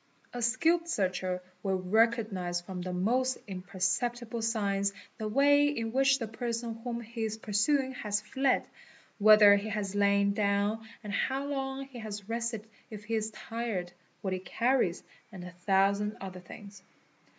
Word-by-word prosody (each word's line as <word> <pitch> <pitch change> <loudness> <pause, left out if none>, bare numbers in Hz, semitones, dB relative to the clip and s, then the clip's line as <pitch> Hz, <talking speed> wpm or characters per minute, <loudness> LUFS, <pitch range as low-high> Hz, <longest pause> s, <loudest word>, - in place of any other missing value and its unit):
A 245 - -4
skilled 325 +9 +2
searcher 185 - -1 0.2
will 190 -2 0
recognise 205 -3 +1
from 180 +1 -7
the 180 0 -4
mos 245 +8 +1
imperceptible 205 +5 -2
signs 200 -3 0 0.3
the 215 - -2
way 285 +5 +4
in 230 -6 -2
which 270 +2 +4
the 230 -4 -4
person 230 0 -4
whom 240 -1 -3
he 230 0 -5
is 220 0 -2
pursuing 260 +6 +1
has 210 -5 -1
fled, 265 +5 +1 0.5
whether 210 -1 +8
he 205 +2 -4
has 205 -2 -3
lain 200 0 +3
down 205 +2 0 0.2
and 210 -1 -5
how 265 +6 0
long 270 -1 -3
he 265 -3 -10
has 210 -2 -6
rested 230 -1 -3 0.2
if 210 -2 -8
he 225 +2 -5
ii 220 - +2
tired, 220 -6 -4 0.3
what 190 -2 -2
he 185 - -2
carries 230 -1 +1 0.3
and 185 -4 -9
a 180 - -8
thousand 195 +3 +1
other 185 -1 -7
things. 200 +2 -12
215 Hz, 155 wpm, -30 LUFS, 200-240 Hz, 0.5 s, whether